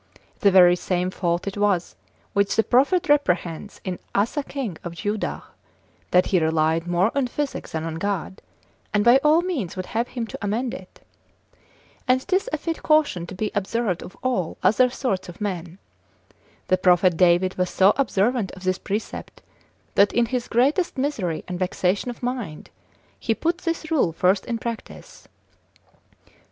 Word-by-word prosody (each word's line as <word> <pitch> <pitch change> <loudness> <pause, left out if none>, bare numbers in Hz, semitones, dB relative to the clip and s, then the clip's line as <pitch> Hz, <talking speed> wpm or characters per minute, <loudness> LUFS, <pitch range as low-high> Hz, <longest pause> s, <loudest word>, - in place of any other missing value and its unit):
The 200 - +5
very 180 -2 +7
same 180 0 -1
fault 175 -1 -1
it 200 0 -4
was, 200 -4 +1 0.4
which 200 0 +1
the 225 - +4
prophet 310 +11 +3
reprehends 180 - 0
in 185 -2 -4 0.2
Asa 225 +9 +1
king 265 - -5
of 170 -1 -6
Judah, 205 +4 -3 0.7
that 180 0 +4
he 185 - +2
relied 160 +1 +1
more 175 +5 +2
on 275 -2 +1
physic 285 +3 -4
than 160 -1 -3
on 165 0 -4
God, 200 -2 -3 0.5
and 205 - +3
by 240 +2 +8
all 310 +3 +4
means 295 - -3
would 185 -1 -4
have 230 +5 -2
him 240 -3 -4
to 215 - -8
amend 225 +4 -1
it. 185 - -11 1.1
And 255 +1 +2
'tis 390 +6 +1
a - - 0
fit 330 -1 -4
caution 300 - +2
to 185 - -8
be 210 +2 -2
observed 205 -2 -1
of 185 - -11
all 245 -10 -1
other 250 +4 +4
sorts 200 -8 -2
of 175 - -11
men. 180 -4 -4 0.9
The 185 - +2
prophet 180 -1 +4
David 180 +2 +3
was 180 -1 +1
so 195 +2 +4
observant 235 -4 +1
of 185 - -11
this 185 0 0
precept, 210 +3 -5 0.5
that 200 +1 +4
in 240 0 +3
his 245 +1 -3
greatest 280 +9 +1
misery 225 - -2
and 180 -1 -4
vexation 185 +4 0
of 245 - -8
mind, 240 -11 -4 0.5
he 225 - 0
put 335 +7 -1
this 330 -2 -3
rule 260 - +2
first 185 +4 +1
in 235 -2 -1
practice. 230 0 -8
200 Hz, 165 wpm, -23 LUFS, 180-250 Hz, 1.1 s, by